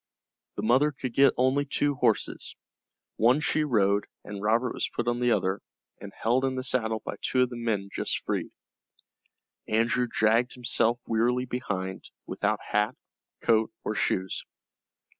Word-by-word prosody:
The -, -, -4 dB
mother 135 Hz, +7 st, +4 dB
could 130 Hz, -3 st, -5 dB
get 135 Hz, 0 st, +5 dB
only 130 Hz, +3 st, +3 dB
two 145 Hz, 0 st, 0 dB
horses. 135 Hz, -, 0 dB, 0.6 s
One 120 Hz, +6 st, +4 dB
she 155 Hz, 0 st, +1 dB
rode, 105 Hz, -7 st, +2 dB, 0.2 s
and 100 Hz, -1 st, -7 dB
Robert 115 Hz, +4 st, +1 dB
was -, -, -2 dB
put 120 Hz, -, -3 dB
on 120 Hz, 0 st, +1 dB
the 125 Hz, -1 st, +2 dB
other, 95 Hz, -3 st, +1 dB, 0.4 s
and 100 Hz, -, -9 dB
held 120 Hz, +6 st, 0 dB
in 135 Hz, -1 st, 0 dB
the 130 Hz, -, -3 dB
saddle 110 Hz, -4 st, +1 dB
by -, -, -5 dB
two 130 Hz, -1 st, +2 dB
of 125 Hz, -, -2 dB
the -, -, -5 dB
men 110 Hz, -4 st, -2 dB
just -, -, -2 dB
freed. -, -, -2 dB, 1.2 s
Andrew 115 Hz, +3 st, +2 dB
dragged 115 Hz, +2 st, +2 dB
himself 120 Hz, -1 st, +1 dB
wearily 120 Hz, +3 st, +1 dB
behind, 100 Hz, -7 st, -4 dB, 0.2 s
without -, -, -1 dB
hat, 105 Hz, +4 st, +1 dB, 0.5 s
coat, 110 Hz, -1 st, +2 dB
or -, -, -2 dB
shoes. 95 Hz, 0 st, -1 dB
120 Hz, 155 wpm, -27 LUFS, 110-130 Hz, 1.2 s, get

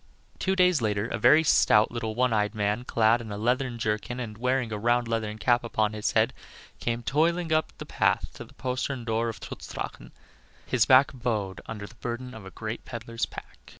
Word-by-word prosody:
Two 190 Hz, 0 st, +1 dB
days 180 Hz, -6 st, +4 dB
later 105 Hz, -1 st, 0 dB
a -, -, -3 dB
very 155 Hz, +8 st, +6 dB
stout 110 Hz, -7 st, +4 dB
little 115 Hz, -2 st, -3 dB
one 125 Hz, 0 st, +2 dB
eyed 105 Hz, 0 st, +1 dB
man, 105 Hz, +3 st, 0 dB
clad 115 Hz, 0 st, +3 dB
in 110 Hz, -2 st, -8 dB
a 100 Hz, -, -4 dB
leathern 125 Hz, +2 st, 0 dB
jerkin 110 Hz, +2 st, -2 dB
and 110 Hz, -4 st, -5 dB
wearing 125 Hz, 0 st, 0 dB
a 105 Hz, -, -2 dB
round 120 Hz, +2 st, +2 dB
leathern 110 Hz, -2 st, -2 dB
cap 120 Hz, +2 st, +2 dB
upon 110 Hz, -2 st, 0 dB
his 105 Hz, -1 st, -1 dB
head, -, -, +3 dB, 0.5 s
came 120 Hz, 0 st, -2 dB
toiling 165 Hz, +5 st, +1 dB
up 155 Hz, 0 st, +1 dB
the -, -, -7 dB
path -, -, 0 dB
to -, -, -8 dB
the -, -, -18 dB
postern 130 Hz, 0 st, -3 dB
door 115 Hz, 0 st, 0 dB
of 115 Hz, -, -7 dB
Trutz -, -, -8 dB
Drachen, -, -, -6 dB, 0.5 s
his 120 Hz, -4 st, +2 dB
back 130 Hz, +1 st, +6 dB
bowed 110 Hz, -7 st, -2 dB
under 105 Hz, -2 st, -6 dB
the 100 Hz, -, -13 dB
burthen 120 Hz, +2 st, -5 dB
of 110 Hz, -3 st, -10 dB
a -, -, -7 dB
great 110 Hz, +3 st, -6 dB
peddler's 115 Hz, -1 st, -4 dB
pack. -, -, -11 dB
115 Hz, 205 wpm, -27 LUFS, 110-125 Hz, 0.5 s, very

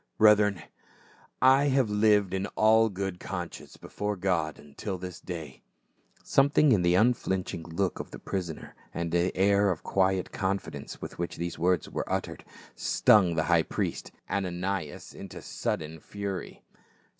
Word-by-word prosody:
" -, -, -49 dB
Brethren, 105 Hz, -4 st, +5 dB, 0.8 s
I 135 Hz, +2 st, +6 dB
have 135 Hz, -6 st, +2 dB
lived 105 Hz, -2 st, +3 dB
in 95 Hz, +1 st, -1 dB
all 110 Hz, +1 st, +5 dB
good 95 Hz, -2 st, -4 dB
conscience 90 Hz, -2 st, -6 dB
before 105 Hz, 0 st, -4 dB
God 90 Hz, -6 st, -1 dB
until 75 Hz, +7 st, -6 dB
this 90 Hz, -1 st, -7 dB
day." 80 Hz, -7 st, -7 dB, 0.6 s
Something 140 Hz, +1 st, +4 dB
in 105 Hz, -6 st, +4 dB
the 85 Hz, 0 st, +3 dB
unflinching 95 Hz, -5 st, +1 dB
look 85 Hz, +3 st, -2 dB
of -, -, -6 dB
the -, -, -9 dB
prisoner, 90 Hz, -5 st, -5 dB, 0.2 s
and 85 Hz, -1 st, -2 dB
the 85 Hz, +2 st, +2 dB
air 100 Hz, +1 st, +4 dB
of 90 Hz, -4 st, -2 dB
quiet 95 Hz, -1 st, +1 dB
confidence 95 Hz, +1 st, -4 dB
with -, -, -8 dB
which 85 Hz, -, -3 dB
these 85 Hz, 0 st, -4 dB
words 90 Hz, -1 st, +2 dB
were -, -, -4 dB
uttered -, -, -3 dB, 0.3 s
stung 95 Hz, -5 st, +4 dB
the 80 Hz, -, +1 dB
high 85 Hz, 0 st, +4 dB
priest, -, -, -3 dB, 0.2 s
Ananias, 90 Hz, -3 st, -3 dB
into -, -, -9 dB
sud -, -, -3 dB
den 80 Hz, +1 st, -8 dB
fury. 100 Hz, 0 st, -6 dB
95 Hz, 150 wpm, -28 LUFS, 85-105 Hz, 0.8 s, I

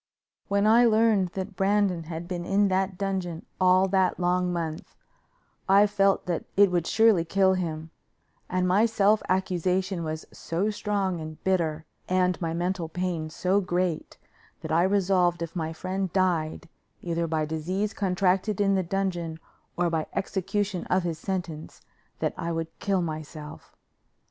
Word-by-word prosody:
When 200 Hz, +1 st, +1 dB
I 230 Hz, +3 st, +6 dB
learned 220 Hz, -4 st, +3 dB
that 190 Hz, +1 st, -5 dB
Brandon 195 Hz, -3 st, +1 dB
had 165 Hz, +1 st, -6 dB
been 175 Hz, -1 st, -4 dB
in 195 Hz, +2 st, +2 dB
that 190 Hz, 0 st, 0 dB
dungeon 185 Hz, -4 st, -3 dB
all 185 Hz, +1 st, +5 dB
that 190 Hz, -1 st, +2 dB
long 180 Hz, 0 st, +1 dB
month, 165 Hz, -2 st, -4 dB, 0.7 s
I 200 Hz, +2 st, +7 dB
felt 200 Hz, -1 st, +2 dB
that 175 Hz, -3 st, -2 dB
it 200 Hz, -2 st, +6 dB
would 175 Hz, -2 st, 0 dB
surely 220 Hz, -6 st, +4 dB
kill 190 Hz, +2 st, +3 dB
him, 160 Hz, -3 st, -3 dB, 0.6 s
and 185 Hz, 0 st, +1 dB
my 200 Hz, +5 st, +4 dB
self 215 Hz, -1 st, +3 dB
accusation 185 Hz, 0 st, 0 dB
was 155 Hz, 0 st, -4 dB
so 185 Hz, +6 st, -2 dB
strong 200 Hz, -4 st, -1 dB
and 155 Hz, 0 st, -7 dB
bitter, 165 Hz, -4 st, 0 dB, 0.2 s
and 185 Hz, 0 st, +1 dB
my 165 Hz, -1 st, -1 dB
mental 175 Hz, 0 st, -2 dB
pain 175 Hz, -2 st, -3 dB
so 185 Hz, +5 st, +1 dB
great, 180 Hz, -3 st, -2 dB, 0.4 s
that -, -, -6 dB
I 165 Hz, +2 st, +4 dB
resolved 180 Hz, -3 st, +2 dB
if 165 Hz, -, -7 dB
my 160 Hz, -2 st, -2 dB
friend 185 Hz, +2 st, -3 dB
died, 175 Hz, -5 st, 0 dB, 0.4 s
either 170 Hz, -1 st, -1 dB
by 155 Hz, -1 st, 0 dB
disease 180 Hz, +7 st, -2 dB
contracted 190 Hz, +1 st, +1 dB
in 200 Hz, -1 st, +3 dB
the 190 Hz, -, +2 dB
dungeon 175 Hz, -3 st, -2 dB, 0.4 s
or 175 Hz, -1 st, +1 dB
by 160 Hz, -2 st, -1 dB
execution 195 Hz, 0 st, -2 dB
of 185 Hz, 0 st, +1 dB
his 165 Hz, -3 st, -3 dB
sentence, 175 Hz, -5 st, -5 dB, 0.4 s
that -, -, -1 dB
I 170 Hz, -, -2 dB
would 165 Hz, 0 st, -3 dB
kill 195 Hz, -3 st, 0 dB
myself. 155 Hz, -1 st, -7 dB
180 Hz, 155 wpm, -26 LUFS, 165-195 Hz, 0.7 s, I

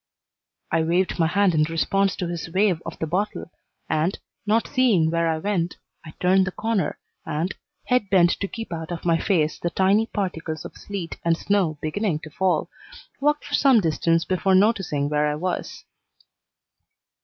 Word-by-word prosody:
I 165 Hz, -, +2 dB
waved 175 Hz, +3 st, 0 dB
my 165 Hz, -, +4 dB
hand 200 Hz, +1 st, +2 dB
in 155 Hz, -, +3 dB
response 195 Hz, +5 st, +1 dB
to 180 Hz, -, -3 dB
his 170 Hz, -2 st, -5 dB
wave 185 Hz, -1 st, +2 dB
of -, -, -6 dB
the -, -, -2 dB
bottle, 180 Hz, +2 st, -2 dB, 0.4 s
and, 160 Hz, +4 st, 0 dB, 0.3 s
not 225 Hz, +2 st, +3 dB
seeing 220 Hz, -, +3 dB
where 170 Hz, 0 st, +1 dB
I 160 Hz, -, 0 dB
went, 180 Hz, -1 st, -1 dB, 0.3 s
I 155 Hz, -1 st, -11 dB
turned 185 Hz, +1 st, +3 dB
the -, -, -2 dB
corner 220 Hz, 0 st, -1 dB, 0.3 s
and, 160 Hz, +6 st, -2 dB, 0.3 s
head 250 Hz, -5 st, +1 dB
bent 175 Hz, -3 st, +5 dB
to 200 Hz, -, -2 dB
keep 225 Hz, -3 st, -7 dB
out 160 Hz, 0 st, -5 dB
of 170 Hz, -1 st, -5 dB
my 165 Hz, -1 st, +3 dB
face 160 Hz, -6 st, +1 dB
the 170 Hz, -, -1 dB
tiny 195 Hz, +5 st, +2 dB
particles 165 Hz, -7 st, -4 dB
of -, -, -9 dB
sleet 195 Hz, -5 st, -6 dB
and 165 Hz, -1 st, +2 dB
snow 185 Hz, -7 st, 0 dB
beginning 165 Hz, +2 st, -1 dB
to 155 Hz, -, -10 dB
fall, 185 Hz, +3 st, +1 dB, 0.5 s
walked 295 Hz, +2 st, +1 dB
for 290 Hz, -, -8 dB
some 270 Hz, -5 st, +5 dB
distance 165 Hz, -1 st, +1 dB
before 185 Hz, +1 st, +2 dB
noticing 190 Hz, -8 st, +2 dB
where 150 Hz, 0 st, +1 dB
I 150 Hz, -, -1 dB
was. 180 Hz, +4 st, -4 dB
180 Hz, 175 wpm, -24 LUFS, 165-200 Hz, 0.5 s, bent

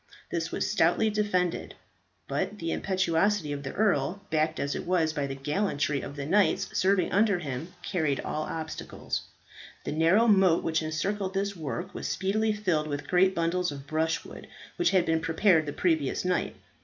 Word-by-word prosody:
This -, -, -2 dB
was -, -, -1 dB
stoutly 220 Hz, -1 st, +2 dB
defended. 185 Hz, -5 st, -1 dB, 0.5 s
But 210 Hz, -, -2 dB
the 165 Hz, -3 st, -3 dB
impetuosity 185 Hz, -2 st, +1 dB
of 140 Hz, -, -4 dB
the 135 Hz, -1 st, -6 dB
earl, 185 Hz, -4 st, +1 dB
backed 155 Hz, 0 st, +1 dB
as 140 Hz, 0 st, -1 dB
it -, -, -5 dB
was 165 Hz, -3 st, +2 dB
by 145 Hz, -3 st, -1 dB
the 135 Hz, -, -5 dB
gallantry 145 Hz, -1 st, -1 dB
of 140 Hz, -, -7 dB
the 140 Hz, -1 st, -4 dB
knights 200 Hz, +3 st, +2 dB
serving 190 Hz, 0 st, +2 dB
under 205 Hz, -1 st, +3 dB
him, 155 Hz, +1 st, -6 dB
carried 155 Hz, -7 st, 0 dB
all 155 Hz, 0 st, -3 dB
obstacles. 160 Hz, -1 st, -4 dB, 0.6 s
The -, -, -3 dB
narrow 165 Hz, +9 st, +4 dB
moat 190 Hz, -5 st, +4 dB
which 160 Hz, 0 st, 0 dB
encircled 190 Hz, +5 st, -2 dB
this 200 Hz, +1 st, -1 dB
work 175 Hz, +4 st, -5 dB
was -, -, -4 dB
speedily 215 Hz, +3 st, 0 dB
filled 185 Hz, -8 st, 0 dB
with 145 Hz, -1 st, -4 dB
great 190 Hz, +3 st, +3 dB
bundles 170 Hz, +1 st, 0 dB
of 140 Hz, -1 st, -8 dB
brushwood, 160 Hz, +2 st, -2 dB, 0.3 s
which 350 Hz, -, +3 dB
had 185 Hz, -3 st, +3 dB
been 160 Hz, 0 st, +2 dB
prepared 165 Hz, -1 st, +3 dB
the -, -, -2 dB
previous 160 Hz, -3 st, 0 dB
night. 180 Hz, 0 st, 0 dB
170 Hz, 170 wpm, -28 LUFS, 155-195 Hz, 0.6 s, narrow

